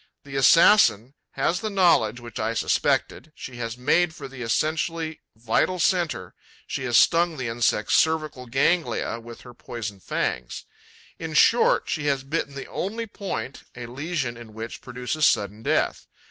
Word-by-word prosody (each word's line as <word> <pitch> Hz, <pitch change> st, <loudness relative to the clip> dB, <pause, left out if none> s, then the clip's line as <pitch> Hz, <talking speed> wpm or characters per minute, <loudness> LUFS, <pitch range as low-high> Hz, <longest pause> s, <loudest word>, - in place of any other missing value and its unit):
The 140 Hz, -1 st, -9 dB
assassin 135 Hz, -, +5 dB, 0.2 s
has 175 Hz, -, 0 dB
the 220 Hz, -, -3 dB
knowledge 170 Hz, -, +3 dB
which 120 Hz, -1 st, -9 dB
I 115 Hz, +1 st, -1 dB
suspected: 155 Hz, -, 0 dB
she 125 Hz, -2 st, -9 dB
has 115 Hz, 0 st, -5 dB
made 160 Hz, +6 st, +2 dB
for 140 Hz, -, -8 dB
the 135 Hz, -1 st, -10 dB
essentially 155 Hz, +6 st, -1 dB
vital 115 Hz, +11 st, 0 dB
centre, 170 Hz, -, 0 dB, 0.3 s
she 130 Hz, -, -4 dB
has 120 Hz, -2 st, +3 dB
stung 170 Hz, -1 st, +4 dB
the 130 Hz, -2 st, -3 dB
insect's 115 Hz, -2 st, 0 dB
cervical 155 Hz, -5 st, 0 dB
ganglia 135 Hz, -2 st, 0 dB
with 115 Hz, 0 st, -11 dB
her 125 Hz, -, -13 dB
poison 110 Hz, -4 st, -7 dB
fangs. 60 Hz, -8 st, -3 dB, 0.5 s
In 160 Hz, -2 st, -5 dB
short, 235 Hz, +9 st, +4 dB
she 150 Hz, -2 st, -2 dB
has 135 Hz, -2 st, 0 dB
bitten 140 Hz, 0 st, -3 dB
the 135 Hz, -, -6 dB
only 225 Hz, +5 st, -4 dB
point 200 Hz, -10 st, -6 dB
a 125 Hz, -1 st, -7 dB
lesion 135 Hz, -1 st, -4 dB
in 115 Hz, -2 st, -12 dB
which 115 Hz, +1 st, -7 dB
produces 125 Hz, +4 st, 0 dB
sudden 105 Hz, +1 st, 0 dB
death. -, -, 0 dB
135 Hz, 155 wpm, -24 LUFS, 115-165 Hz, 0.5 s, assassin